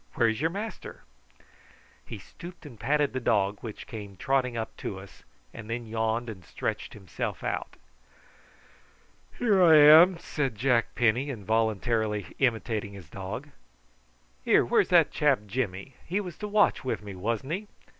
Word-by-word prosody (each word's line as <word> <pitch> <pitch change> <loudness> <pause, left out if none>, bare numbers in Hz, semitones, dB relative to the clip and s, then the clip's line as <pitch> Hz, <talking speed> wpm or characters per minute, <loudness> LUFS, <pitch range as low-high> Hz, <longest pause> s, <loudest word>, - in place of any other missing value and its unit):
Where's 115 +1 +1
your 160 - +2
master?" 205 +5 -7 1.0
He - - -8
stooped 175 0 -12
and 120 -7 -12
patted 145 -1 +1
the 130 - -1
dog, 105 -4 +1
which 110 -3 -8
came 100 -4 -9
trotting 130 -1 0
up 110 - -4
to 95 - -5
us, 95 0 -14 0.3
and 115 -2 -10
then 115 +1 -3
yawned 110 +1 -1
and 100 -5 -8
stretched - - -4
himself 95 -5 -5
out. - - -3 1.6
"Here 210 -6 +3
I 165 -3 +7
am," 160 +5 +8
said 140 -7 -3
Jack 120 +1 +1
Penny, 120 +4 +2
involuntarily 110 -1 0
imitating 110 -5 0
his 90 -5 -12
dog. 100 +9 -6 0.9
"Here, - - +4
where's - - +2
that - - +5
chap - - +2
Jimmy? 100 0 -4
He 185 +4 -2
was 180 -5 -6
to 210 - -4
watch 210 0 +2
with 130 -4 -3
me, 100 -1 -8
wasn't 115 +8 -3
he? 205 +4 -4
115 Hz, 150 wpm, -27 LUFS, 105-145 Hz, 1.6 s, am